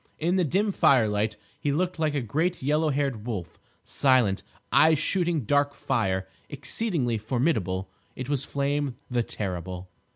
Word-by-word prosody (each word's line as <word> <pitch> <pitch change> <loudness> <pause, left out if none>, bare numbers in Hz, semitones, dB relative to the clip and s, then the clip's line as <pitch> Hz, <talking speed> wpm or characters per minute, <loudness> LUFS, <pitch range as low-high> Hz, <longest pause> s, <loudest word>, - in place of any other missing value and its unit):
In 175 +4 +1
the 185 - +3
dim 195 +7 +1
firelight 110 - +3 0.2
he 145 - 0
looked 180 +3 -1
like 155 -2 +1
a 140 - +1
great 160 - -1
yellow 150 +3 +2
haired 135 -6 -1
wolf, 95 -9 -5 0.2
silent, 125 -8 +2 0.3
eyes 160 0 +6
shooting 170 0 0
dark 145 +4 +1
fire, 95 -6 -1 0.2
exceedingly 140 - -1
formidable. 110 - 0 0.3
It 130 - -5
was 140 -2 0
Flame, 140 -1 -1 0.2
the 120 -1 +2
terrible. 90 -4 -5
135 Hz, 140 wpm, -26 LUFS, 110-155 Hz, 0.3 s, eyes